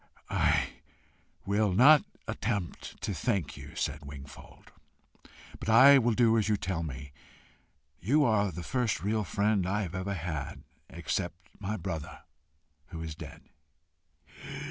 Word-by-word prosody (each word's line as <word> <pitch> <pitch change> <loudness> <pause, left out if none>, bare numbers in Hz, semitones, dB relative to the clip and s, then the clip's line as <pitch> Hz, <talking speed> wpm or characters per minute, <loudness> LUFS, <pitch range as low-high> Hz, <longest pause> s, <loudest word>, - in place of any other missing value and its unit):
"I - - +2 0.8
will 105 +1 +2
not 145 +9 +7 0.2
attempt 100 -5 -3
to 100 - -1
thank 95 - -1
you," - - -11
said 75 +2 -2
Wingfold, 70 -1 -12 0.9
"but - - -4
I 135 +5 +8
will 120 -2 +2
do 115 -1 +4
as 110 0 0
you 105 - +3
tell 95 -4 -2
me. 70 -3 -6 0.9
You 145 - +3
are 105 -4 +2
the 85 +1 -6
first 120 -8 -1
real 105 +2 +1
friend 100 -1 +1
I 105 +2 0
have 90 -2 -6
ever 95 +2 -3
had 80 -4 -5 0.3
except - - -3 0.2
my 105 +1 -3
brother, 80 -4 -6 0.6
who 85 -3 -8
is 80 -1 -5
dead." - - -10
100 Hz, 135 wpm, -30 LUFS, 85-110 Hz, 0.9 s, I